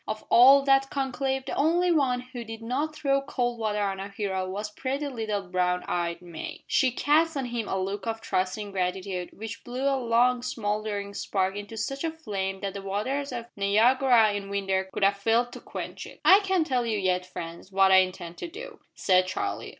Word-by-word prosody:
Of 215 Hz, 0 st, -4 dB
all 270 Hz, +3 st, +8 dB
that 270 Hz, 0 st, +3 dB
conclave 265 Hz, -1 st, -2 dB
the -, -, -4 dB
only 345 Hz, +4 st, +2 dB
one 265 Hz, -6 st, +2 dB
who 250 Hz, -1 st, -8 dB
did 225 Hz, 0 st, -8 dB
not 285 Hz, +7 st, -2 dB
throw 275 Hz, -2 st, +1 dB
cold 245 Hz, -3 st, -2 dB
water 210 Hz, -2 st, 0 dB
on 195 Hz, -1 st, -2 dB
our 195 Hz, +1 st, -5 dB
hero 190 Hz, -2 st, -3 dB
was 205 Hz, +3 st, -4 dB
pretty 275 Hz, +6 st, -3 dB
little 220 Hz, -6 st, -3 dB
brown 180 Hz, -1 st, 0 dB
eyed 170 Hz, 0 st, -2 dB
May. 170 Hz, -2 st, -8 dB
She 260 Hz, -, +3 dB
cast 300 Hz, +5 st, +2 dB
on 270 Hz, -, -1 dB
him 235 Hz, -3 st, -3 dB
a 190 Hz, -, -1 dB
look 195 Hz, +4 st, -3 dB
of 225 Hz, 0 st, -2 dB
trusting 200 Hz, 0 st, -2 dB
gratitude 185 Hz, -1 st, -2 dB
which 225 Hz, +2 st, -8 dB
blew 250 Hz, +2 st, -5 dB
a 275 Hz, -, +3 dB
long 240 Hz, +1 st, +3 dB
smouldering 210 Hz, -4 st, -3 dB
spark 190 Hz, -1 st, -1 dB
into 205 Hz, +2 st, -7 dB
such 275 Hz, +6 st, -3 dB
a 330 Hz, -, +1 dB
flame 195 Hz, -12 st, -4 dB
that 195 Hz, -1 st, -3 dB
the 200 Hz, -, -6 dB
waters 240 Hz, +9 st, -2 dB
of 240 Hz, -2 st, -5 dB
Niagara 225 Hz, +2 st, +4 dB
in 200 Hz, -1 st, -4 dB
winter 190 Hz, -1 st, -1 dB
would -, -, -1 dB
have 200 Hz, 0 st, +4 dB
failed 230 Hz, +4 st, +1 dB
to -, -, -8 dB
quench -, -, -7 dB
it. -, -, -14 dB
"I 385 Hz, -, +9 dB
can't 380 Hz, -5 st, +1 dB
tell 255 Hz, -4 st, 0 dB
you 220 Hz, -2 st, 0 dB
yet, 185 Hz, -2 st, +1 dB
friends, 170 Hz, +1 st, -8 dB
what 195 Hz, 0 st, +4 dB
I 190 Hz, -, +8 dB
intend 185 Hz, -2 st, 0 dB
to -, -, -4 dB
do," 465 Hz, +9 st, -10 dB, 0.2 s
said 185 Hz, -1 st, +3 dB
Charlie. 400 Hz, -, -3 dB
220 Hz, 205 wpm, -27 LUFS, 195-265 Hz, 0.2 s, I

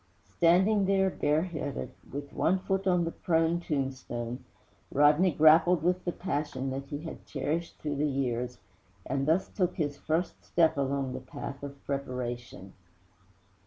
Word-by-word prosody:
Standing 190 Hz, +5 st, +4 dB
there 190 Hz, -1 st, +3 dB
bareheaded, 155 Hz, -2 st, -1 dB, 0.2 s
with 140 Hz, 0 st, -6 dB
one 190 Hz, -, +2 dB
foot 195 Hz, +1 st, -1 dB
on 180 Hz, -2 st, +3 dB
the 165 Hz, -, -2 dB
prone 165 Hz, -1 st, +1 dB
tombstone, 130 Hz, -6 st, -3 dB, 0.5 s
Rodney 150 Hz, +6 st, +5 dB
grappled 160 Hz, +2 st, +5 dB
with 180 Hz, +1 st, +1 dB
the 175 Hz, -, 0 dB
passion 145 Hz, -7 st, -3 dB
that 135 Hz, +1 st, -5 dB
he 145 Hz, +1 st, -5 dB
had 165 Hz, -, -7 dB
cherished 155 Hz, +4 st, -2 dB
through 145 Hz, -2 st, -3 dB
the 150 Hz, +1 st, +1 dB
years, 125 Hz, -2 st, -2 dB, 0.5 s
and 135 Hz, +2 st, -1 dB
thus 165 Hz, +4 st, +3 dB
took 180 Hz, -2 st, -1 dB
his 145 Hz, -5 st, -2 dB
first 165 Hz, +3 st, -2 dB
step 165 Hz, -1 st, +3 dB
along 135 Hz, -1 st, -1 dB
the 130 Hz, -, -4 dB
path 135 Hz, +1 st, -7 dB
of 140 Hz, -1 st, -9 dB
preparation. 120 Hz, -7 st, -4 dB
150 Hz, 145 wpm, -29 LUFS, 135-175 Hz, 0.5 s, Rodney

